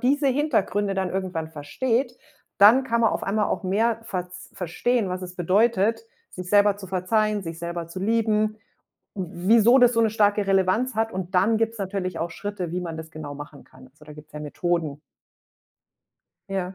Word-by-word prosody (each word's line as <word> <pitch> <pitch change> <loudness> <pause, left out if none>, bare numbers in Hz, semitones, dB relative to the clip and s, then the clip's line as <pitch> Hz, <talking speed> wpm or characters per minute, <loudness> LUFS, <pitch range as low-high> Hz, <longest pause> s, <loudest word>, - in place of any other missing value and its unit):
diese 280 +2 +2
Hintergründe 220 -8 0
dann 190 -1 -1
irgendwann 180 -4 -3
versteht, 225 - -2 0.4
dann 230 +6 +7
kann 235 -2 0
man 225 - +4
auf - - -3
einmal 210 +2 0
auch - - -2
mehr 220 +5 +1
verz 180 -2 -6
verstehen, 200 +5 -1
was 185 0 -4
es 180 0 -7
bedeutet, 205 - +2 0.3
sich 180 -1 -8
selber 205 0 +4
zu 200 - -9
verzeihen, 205 +3 0
sich 165 -1 -7
selber 170 0 -5
zu 175 +2 -7
lieben, 215 0 +1 0.6
w 180 -1 -5
wieso 235 +3 +6
das 245 -1 +6
so 230 - +2
'ne 225 -1 +3
starke 205 -1 +2
Relevanz 195 +6 +1
hat. 225 +1 -1
Und 185 0 -5
dann 205 +5 +3
gibt 225 0 0
es 230 - -12
natürlich 185 -3 -3
auch 170 +1 -3
Schritte, 185 -1 -5
wie 180 - -2
man 165 -2 -5
das 160 0 -8
genau 150 -2 -7
machen 145 0 -10
kann. 130 0 -17
Also, 150 +3 -20
da 150 - -11
gibt's 150 0 -14
ja 150 - -7
Methoden. 155 -1 -2 1.5
Ja. 190 -1 -3
195 Hz, 185 wpm, -24 LUFS, 175-220 Hz, 1.5 s, dann